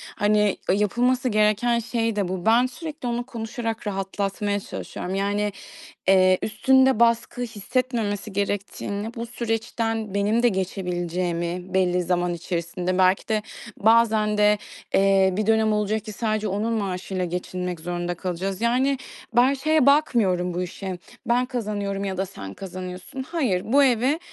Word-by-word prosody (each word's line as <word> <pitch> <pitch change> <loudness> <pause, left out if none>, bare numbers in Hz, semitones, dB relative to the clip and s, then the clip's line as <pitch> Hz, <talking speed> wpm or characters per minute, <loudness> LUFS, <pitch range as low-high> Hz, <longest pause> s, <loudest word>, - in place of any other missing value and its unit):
hani, 210 -1 +2
e, - - +5
yapılması 245 +5 +1
gereken 215 +3 +2
şey 230 -1 -1
de 200 -3 0
bu. 180 -1 -4
Ben 235 +3 +5
sürekli 295 +1 -6
onu 240 0 -2
konuşarak 230 -2 -4
rahatlatmaya 200 +1 -2
çalışıyorum. 190 -1 -6
Yani, 205 +1 0 0.6
eee, 185 -1 +5
üstünde 260 +3 +3
baskı 235 +1 +2
hissetmemesi 225 -2 -2
gerektiğini, 205 +2 -3
bu 235 0 -4
süreçten 225 -2 -2
benim 210 +4 +2
de 240 - +6
geçebileceğimi 180 -2 -2
belli 180 -1 +2
zaman 175 0 0
içerisinde 175 +2 -3
belki 185 +1 +3
de 215 -1 +1 0.3
bazen 220 -1 +3
de, 210 0 +4 0.4
eee, 195 -1 +4
bir 215 - 0
dönem 220 -1 +3
olacak 210 0 0
ki 215 - -7
sadece 215 0 -1
onun 210 +4 -1
maaşıyla 190 -3 -2
geçinmek 180 0 -4
zorunda 175 +1 -3
kalacağız. 185 +3 -3
Yani, 255 +3 +2 0.4
ben 255 +3 +5
şeye 310 0 +2
bakmıyorum 205 - +3
bu 180 - -1
işe, 185 0 -5 0.3
ben 245 +1 +2
kazanıyorum 200 -3 -3
ya 190 -1 -3
da 190 - -1
sen 100 - -9
kazanıyorsun. 185 +5 -7
Hayır, 260 - -1
bu 280 +1 +6
eve, 260 +4 +2
210 Hz, 140 wpm, -24 LUFS, 185-235 Hz, 0.6 s, de